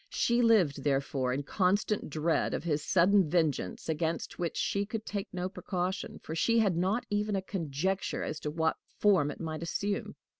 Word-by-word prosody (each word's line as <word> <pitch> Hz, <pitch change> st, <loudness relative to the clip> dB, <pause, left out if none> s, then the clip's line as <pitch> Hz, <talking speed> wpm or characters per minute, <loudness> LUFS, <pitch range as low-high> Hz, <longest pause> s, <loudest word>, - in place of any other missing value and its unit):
She 235 Hz, +1 st, +2 dB
lived, 185 Hz, -, +3 dB
therefore, 135 Hz, -2 st, 0 dB
in 135 Hz, +3 st, -1 dB
constant 200 Hz, +5 st, +1 dB
dread 155 Hz, +2 st, 0 dB
of -, -, -4 dB
his 150 Hz, -3 st, 0 dB
sudden 185 Hz, 0 st, +4 dB
vengeance, 150 Hz, -, 0 dB
against 160 Hz, +1 st, -2 dB
which 170 Hz, -2 st, -2 dB
she 200 Hz, -, 0 dB
could 215 Hz, +1 st, -5 dB
take 200 Hz, -1 st, -4 dB
no 180 Hz, 0 st, -2 dB
precaution, 185 Hz, -1 st, -3 dB
for 160 Hz, -, -5 dB
she 230 Hz, +8 st, +2 dB
had 205 Hz, -6 st, +3 dB
not 190 Hz, +8 st, 0 dB
even 210 Hz, 0 st, 0 dB
a 195 Hz, -, 0 dB
conjecture 185 Hz, +1 st, -2 dB
as 155 Hz, -, -4 dB
to 150 Hz, -, -3 dB
what 160 Hz, +1 st, 0 dB, 0.2 s
form 190 Hz, -9 st, +4 dB
it -, -, -7 dB
might 160 Hz, -1 st, -4 dB
assume. 200 Hz, +4 st, -2 dB
175 Hz, 180 wpm, -30 LUFS, 155-200 Hz, 0.2 s, sudden